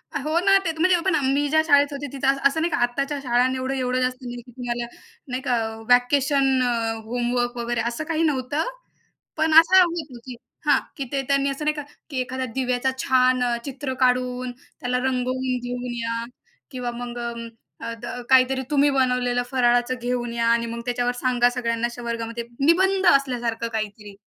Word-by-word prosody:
हो 305 +4 0
ना, 390 +2 +5
ते 330 - +1
तर 320 - -11
म्हणजे 360 +1 +4
पण 380 - +3 0.2
मी 290 +1 +1
ज्या 315 +2 +4
शाळेत 285 -1 +5
होते 285 0 -5
तिथं 270 -1 -2
असं-असं 275 +3 +2
नाही 335 +1 0
का, - - +1
आत्ताच्या 275 +4 -1
शाळांनी 250 +1 +2
एवढं-एवढं 255 -1 -1
जास्त 255 0 0
नाही 245 -1 -6
की 245 +1 -17
तुम्हाला 240 -1 -4 0.4
नाही 255 0 -3
का 250 -3 +1 0.3
व्हॅकेशन, 265 +1 +3 0.4
होमवर्क 245 +1 -1
वगैरे 235 -1 -1
असं 235 +6 -4
काही 320 +1 -1
नव्हतं, 290 -1 0 0.7
पण 315 0 +2
असं 365 +3 +6
होत, 320 -8 -4
की 255 -2 -7 0.3
हां, - - +5 0.2
की 280 - -2
ते 275 -1 0
त्यांनी 275 0 +2
असं 275 +2 -4
नाही 300 0 +1
का, 295 - -5 0.3
की 270 -4 -3
एखाद्या 260 +1 -3
दिव्याचा 255 0 0
छान 255 -1 +3
अ, 240 -1 +1
चित्र 270 -1 -4
काढून, 250 0 +1 0.3
त्याला 250 0 -1
रंगवून 255 0 -1
घेऊन 245 0 -4
या 230 0 -2 0.5
किंवा 250 -2 -4
मग 240 0 -6 0.6
अ, 230 - -4
द - - -6 0.2
काहीतरी 260 0 +4
तुम्ही 290 0 +4
बनवलेलं 250 -2 +1
फराळाचं 245 -1 +2
घेऊन 240 -1 -2
या 235 0 0
आणि 235 0 +2
मग 235 0 -5
त्याच्यावर 245 0 0
सांगा 245 -1 +2
सगळ्यांना 235 -2 -1
अशा 240 0 -9
वर्गामध्ये 230 0 -4 0.2
निबंध 380 +6 +3
असल्यासारखं 240 -4 -1
काहीतरी 210 -2 -5
255 Hz, 175 wpm, -23 LUFS, 245-275 Hz, 0.7 s, असं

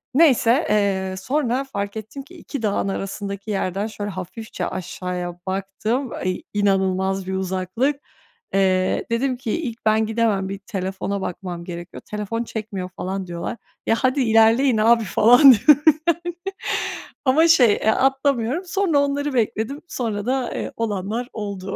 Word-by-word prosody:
Neyse, 270 -3 +4
eee, 195 -3 +1
sonra 255 +4 0
fark 200 -5 -4
ettim 220 +6 -7
ki 360 +6 -16
2 285 -6 -7
dağın 205 -2 0
arasındaki 200 +1 -4
yerden 195 +1 -1
şöyle 205 -1 -5
hafifçe 190 +5 -6
aşağıya 180 -1 -5
baktım. 205 +7 -2
İ 185 - -2
inanılmaz 190 -1 +1
bir 190 - -2
uzaklık. 190 +9 -1 0.6
Eee, 185 -1 +2
dedim 250 +2 0
ki 235 -4 -4
ilk 245 -9 -4
ben 220 0 +3
gidemem, 215 -4 0
bir 195 0 -5
telefona 195 -1 -4
bakmam 175 -2 -5
gerekiyor, 175 0 -8
telefon 210 +2 -3
çekmiyor 205 -5 -5
falan 185 +1 -5
diyorlar. 175 +7 -5 0.3
Ya 225 - +3
hadi 260 +1 +2
ilerleyin 225 +2 +4
abi 230 +1 +4
falan 225 - +5
diyorum 290 +6 +5 0.2
ben. 340 0 +2 1.0
Ama 310 +6 +5
şey, 255 -10 +6
eee, 220 - 0
atlamıyorum, 270 +3 +1
sonra 360 -5 +1
onları 285 0 0
bekledim, 230 +3 -1
sonra 220 -7 -3
da, 255 -1 -1
eee, - - -4
olanlar 225 +2 -2
oldu. 200 -2 -5
215 Hz, 140 wpm, -22 LUFS, 190-255 Hz, 1.0 s, şey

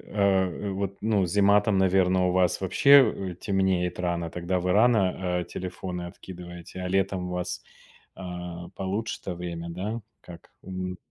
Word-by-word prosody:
а, 95 -1 +1
вот, 100 0 -3
ну, 105 -3 +2
зима 100 +3 +4
там, 105 -2 +1
наверно, 95 -1 +3
у - - +1
вас 90 -1 +2
вообще, 100 -1 +5
э, - - -8
темнеет 95 -2 0
рано, 85 -2 -1
тогда 90 +2 -2
вы 90 +1 0
рано, 95 -5 +3
э, - - -5
телефоны 90 -1 -5
откидываете. 90 0 -10
А 90 - -3
летом 95 -1 0
у - - -4
вас, 90 0 -3 0.5
а, 90 -1 -7
получше-то 95 -1 -3
время, 85 -1 -5
да? 105 +7 -4 0.2
Как? 85 -2 -13
Мгм. 95 -1 -5
95 Hz, 150 wpm, -26 LUFS, 90-95 Hz, 0.5 s, вообще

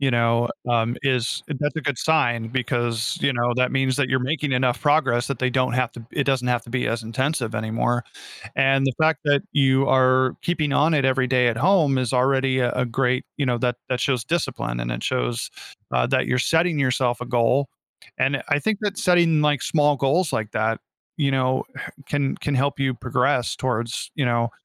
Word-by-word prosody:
you 135 -1 +2
know, 115 0 +2 0.2
um, 120 0 +1
is 130 -3 0
that's 150 +1 -3
a - - -1
good 140 -3 -2
sign 120 -8 +1
because, 120 -2 -1
you 140 - +2
know, 120 -1 0
that 125 0 +1
means 135 -1 +1
that 145 -3 +1
you're 130 - +2
making 145 +3 -2
enough 125 -1 +1
progress 145 -5 +2
that 140 - -3
they 130 0 0
don't 130 0 0
have 125 -2 0
to 120 - -11
it 140 - -1
doesn't 130 -2 0
have 120 -1 +1
to 120 - -14
be 125 0 -1
as 115 0 -3
intensive 120 0 -2
anymore 115 +2 -1 0.5
and 135 0 +3
the 135 - 0
fact 155 -1 +3
that 145 -1 +3
you 135 -1 +3
are 130 0 +3
keeping 155 -4 -1
on 155 +3 +3
it 140 -3 +2
every 130 -1 +2
day 125 -1 +3
at 115 -1 0
home 155 - +3
is 130 -2 -1
already 130 0 +2
a 125 - +1
a 125 0 0
great, 125 +1 0
you 140 - 0
know 120 -1 +1
that 125 0 -1
that 125 -1 -1
shows 125 -2 0
discipline 125 - -2
and - - -3
it - - -4
shows, - - -2 0.4
uh, 60 -1 +2
that - - 0
you're 125 - +1
setting 165 +4 +2
yourself 125 -2 +1
a 125 - -5
goal 125 +3 +1 0.5
and 135 +2 +2
it - - -10
I 145 -1 +3
think 220 +3 -1
that 205 -1 -2
setting, 170 -4 +3
like, 150 -2 +2
small 150 -2 +2
goals 150 +7 +1
like 110 -1 -2
that, 110 +1 -1 0.4
you 140 -3 +1
know, 130 0 +1 0.4
can 140 -2 -1
can 145 - -3
help 140 +2 0
you 135 -1 +1
progress 125 -1 0
towards, 120 -1 -3
you 145 - 0
know, 120 -1 0
130 Hz, 210 wpm, -22 LUFS, 120-140 Hz, 0.5 s, and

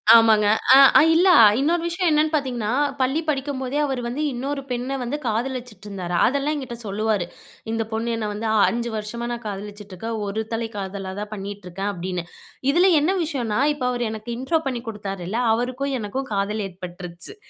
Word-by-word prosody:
ஆமாங்க. 220 -2 +6 0.3
ஆ - - +9 0.2
அ - - +7
இல்ல. 360 +3 +5 0.3
இன்னொரு 330 +5 +2
விஷயம் 345 0 0
என்னன்னு 305 +1 +2
பாத்தீங்கன்னா, 245 -6 -1 0.3
பள்ளி 265 +4 +2
படிக்கும்போதே 270 -1 -2
அவர் 265 -3 -2
வந்து 255 +6 -3
இன்னொரு 275 +3 -3
பெண்ண 250 +2 -2
வந்து 255 +5 -2
காதலிச்சுட்ருந்தாரு. 215 -6 -3
அதெல்லாம் 280 +3 +1
என்கிட்ட 260 -5 -6
சொல்லுவாரு. 210 -2 0 0.5
"இந்த 225 0 0
பொண்ணு 225 +2 -2
என்ன 220 -2 -2
வந்து 220 +2 -3 0.2
5 235 0 -2
வருஷமா 220 +3 -4
நான் 240 0 -5
காதலிச்சுட்ருக்க. 205 +1 -7 0.2
ஒரு 200 +2 -2
தலை 225 0 -1
காதலா 195 -1 -5
தான் 210 0 -6
பண்ணிட்ருக்கேன்" 195 -1 -5
அப்டின்னு. 180 -1 -4 0.5
இதில 355 +5 +5
என்ன 315 +6 +2
விஷயம்னா 250 -8 -2
இப்ப 265 -4 -4
அவரு 245 -1 -1
எனக்கு 220 +1 -7
இன்ட்ரோ 290 +6 +1
பண்ணி 250 -3 -2
கொடுத்தாருல, 195 -1 -4
அவருக்கும் 255 +4 -1
எனக்கும் 260 +6 -4
காதல் 205 +2 -1
ஏற்பட்டுருச்சு. 180 - -9
230 Hz, 160 wpm, -23 LUFS, 205-265 Hz, 0.5 s, ஆ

